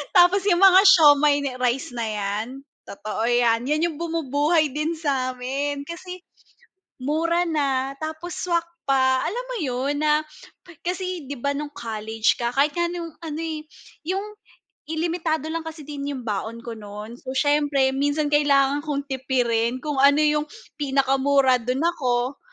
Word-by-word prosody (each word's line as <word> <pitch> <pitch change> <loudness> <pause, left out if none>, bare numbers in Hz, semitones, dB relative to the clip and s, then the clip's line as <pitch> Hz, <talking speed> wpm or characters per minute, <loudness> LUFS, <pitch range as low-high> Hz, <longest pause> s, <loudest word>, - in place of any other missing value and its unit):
Tapos 370 +2 +5
'yong 365 -1 +3
mga 380 -1 +9
siomai 300 -5 +7
na 275 - -2
rice 250 +1 0
na 235 -2 -3
'yan? 210 +1 -2 0.4
Totoo 215 +3 -4
'yan 240 0 +2
'yan 305 +3 +1
'yong 330 -3 -1
bumubuhay 310 -1 +1
din 305 +4 -2
sa 270 -5 -1
amin 280 +3 -3
kasi 360 +3 -8 0.8
mura 335 +6 0
na 275 -3 -1
tapos 315 +3 -6
swak 340 -2 0 0.2
pa, 260 -1 +3
alam 485 +7 -3
mo - - -4
'yon 265 +2 -1
na 300 0 +4 0.6
Kasi 365 -2 -3
'di 275 -1 -7
ba 280 +2 -1
nung 295 0 -5
college 220 -2 -1
ka 235 0 -2
kahit 285 +4 +1
nga 345 - +2
ano 340 -1 -5 0.3
eh, 315 -2 -4 0.4
yong 395 +5 -3 0.5
i 320 - -4
limitado 325 -3 -1
lang 325 0 -4
kasi 320 -1 -7
din 285 -1 -6
'yong 280 -3 -4
baon 225 +1 -4
ko 235 - -6
no'n, 210 +3 -9
so 260 0 -7
siyempre 290 -1 +2
minsan 290 +2 0
kailangan 285 -1 +3
kong 285 -2 -2
tipirin 250 -2 0
kung 295 -3 -3
ano 280 +2 +5
'yong 300 0 +2 0.3
pinakamura 270 -1 +2
do'n 250 +4 -2
ako. 260 -6 0
285 Hz, 155 wpm, -23 LUFS, 255-320 Hz, 0.8 s, mga